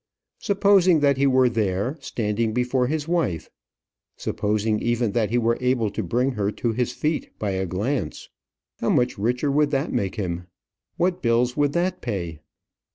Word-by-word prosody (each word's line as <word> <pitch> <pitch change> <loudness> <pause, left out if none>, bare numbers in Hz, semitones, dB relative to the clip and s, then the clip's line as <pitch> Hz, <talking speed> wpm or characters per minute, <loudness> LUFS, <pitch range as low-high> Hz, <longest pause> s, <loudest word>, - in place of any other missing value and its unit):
Supposing 195 -5 +4
that 140 -2 +3
he 140 +1 +3
were 130 -1 +4
there, 110 +2 -1
standing 115 -5 -2
before 125 0 +1
his 150 +1 -2
wife; 165 - -1 0.7
supposing 105 +1 0
even 120 -2 0
that 110 -2 0
he 120 - +1
were 115 0 +1
able 125 -4 +1
to 110 - -3
bring 120 +8 0
her 105 -5 -1
to 120 - -1
his 120 +2 -1
feet 155 0 -2
by 105 -2 -2
a 95 0 -2
glance, 105 - -3 0.5
how - - 0
much 125 -3 +1
richer 125 +7 0
would 150 +1 +3
that 140 +2 -1
make 95 0 -1
him? 90 -4 -4 0.5
What 180 +1 0
bills 120 +1 +2
would 145 -1 +1
that 180 +1 0
pay? 85 -9 -4
120 Hz, 165 wpm, -24 LUFS, 105-145 Hz, 0.7 s, Supposing